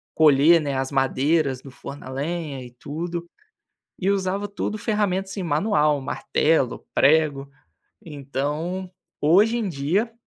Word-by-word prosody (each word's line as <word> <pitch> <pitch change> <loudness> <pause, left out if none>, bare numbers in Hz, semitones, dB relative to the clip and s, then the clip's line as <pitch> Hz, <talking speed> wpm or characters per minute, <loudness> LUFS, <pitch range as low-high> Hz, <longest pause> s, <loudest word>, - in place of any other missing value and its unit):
colher, 155 +2 +6
né, 140 -2 -2
as 135 +1 -1
madeiras 135 +1 +1
do 135 - -12
forno 140 +2 -9
a - - -7
lenha 145 -1 -4
e 125 - -11
tudo. 170 +7 -5 0.7
E 190 +1 0
usava 195 +1 -1
tudo 205 +1 -3
ferramentas 195 -3 -1
assim 195 -2 -4
manual, 150 -3 +2
martelo, 140 0 0
prego. 140 -1 +3 0.6
Então, 150 +5 -4 0.3
hoje 200 +10 +4
em 215 -4 -1
dia, 175 - -1
155 Hz, 130 wpm, -23 LUFS, 140-185 Hz, 0.7 s, colher